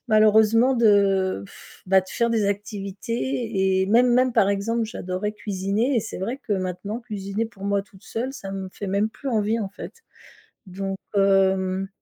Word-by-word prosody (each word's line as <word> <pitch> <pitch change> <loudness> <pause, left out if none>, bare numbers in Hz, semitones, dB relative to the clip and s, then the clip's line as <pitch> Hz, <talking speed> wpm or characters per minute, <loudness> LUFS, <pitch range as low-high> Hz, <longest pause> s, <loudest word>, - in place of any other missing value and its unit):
malheureusement 220 +3 +5
de 200 - +3
pff, - - -16
bah 190 +1 +5
de 185 - -16
faire 235 0 +1
des 225 -2 +1
activités 200 0 -2
et 190 - +1
même 240 +4 +4
même 255 +1 +3
par 210 -4 +3
exemple, 225 +3 0
j'adorais 190 -1 -4
cuisiner 210 +5 -1
et - - +3
c'est 220 - -7
vrai 230 +8 -3
que - - -3
maintenant 190 +4 -3
cuisiner 210 -2 -4
pour 200 -3 -12
moi 200 0 +1
toute 195 -1 -20
seule, 250 +4 -4
ça 195 -6 -7
me 190 -1 -5
fait 205 - -6
même 200 +3 +1
plus 275 +4 -7
envie, 220 0 +1
en 205 -4 -3
fait. 205 - -9 0.7
Donc, 195 +1 -4 0.2
hem, 190 -1 +2
205 Hz, 175 wpm, -24 LUFS, 195-225 Hz, 0.7 s, malheureusement